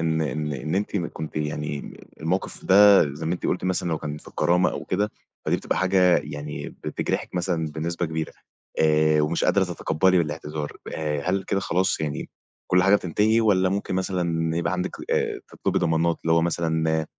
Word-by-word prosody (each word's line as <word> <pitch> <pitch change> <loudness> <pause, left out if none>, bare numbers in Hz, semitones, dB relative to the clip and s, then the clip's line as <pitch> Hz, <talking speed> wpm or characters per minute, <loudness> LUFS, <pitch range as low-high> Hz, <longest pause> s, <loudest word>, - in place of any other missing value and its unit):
إن 80 -1 +1
إن 75 +1 -2
إن 70 +4 -3
أنتِ 105 +1 -1
كنتِ 80 -4 -4
يعني 75 -1 -4 0.2
الموقف 85 +4 -2
ده 100 +1 +7
زي 80 +3 -5
ما 85 - +1
أنتِ 90 - -4
قُلتِ 90 - -1
مثلًا 90 -1 0
لو 80 -2 -1
كان 75 0 -5
في - - -14
الكرامة 90 +1 +2
أو - - -5
كده 105 +3 0 0.4
فدي - - +2
بتبقى - - -2
حاجة 95 -1 +4
يعني 75 0 -6 0.2
بتجرحِك - - -2
مثلًا 85 -3 -1
بنسبة 85 +3 -3
كبيرة 80 0 -4 0.5
آآ، 75 0 +4
ومش 75 +3 0
قادرة 100 - +3
تتقبلي 90 +1 +2
الاعتذار 75 -1 -4 0.2
آآ، 75 -2 -2
هل 95 0 0
كده 100 - 0
خلاص 95 -1 0
يعني 75 -2 -3 0.4
كل 90 0 +4
حاجة 100 +2 +5
بتنتهي 105 +5 +2
والّا 95 -4 +3
ممكن 100 -1 -2
مثلًا 85 -3 -1
يبقى 85 +1 0
عندك 90 0 -1 0.2
آآ، - - 0
تطلبي - - -1
ضمانات 80 +1 +1
اللي 80 - +1
هو 85 0 +4
مثلًا 80 -2 0
85 Hz, 180 wpm, -24 LUFS, 80-95 Hz, 0.5 s, ده